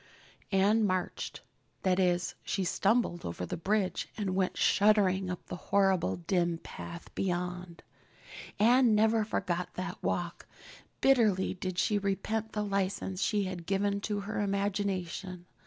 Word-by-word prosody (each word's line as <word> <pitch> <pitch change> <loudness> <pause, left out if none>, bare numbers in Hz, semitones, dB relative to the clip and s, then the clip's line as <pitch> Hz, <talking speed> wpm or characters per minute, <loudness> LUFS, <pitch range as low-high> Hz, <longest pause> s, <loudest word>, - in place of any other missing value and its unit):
Anne 205 +3 +4
marched. 185 -3 -2 0.4
That 185 0 +2
is, 180 -1 +1
she 195 - -1
stumbled 195 0 +1
over 85 +1 -4
the - - -4
bridge 195 +2 0
and 200 -3 -1
went 185 -1 0
shuddering 195 -3 +3
up 180 - -5
the - - -6
horrible 195 -3 +3
dim 170 -1 0
path 170 +1 -9
beyond. 180 -1 -3 0.7
Anne 235 +1 +5
never 220 +1 +3
forgot 180 -4 -2
that 185 0 -5
walk. 175 -1 -2 0.5
Bitterly 220 -8 +3
did 185 -1 -5
she 205 +2 +2
repent 215 +3 -2
the 210 - -1
license 195 -1 -1
she 205 -1 +1
had 180 -3 -5
given 200 +1 0
to 205 0 -2
her 210 +1 -3
imagination. 195 -3 -2
195 Hz, 135 wpm, -31 LUFS, 180-205 Hz, 0.7 s, Anne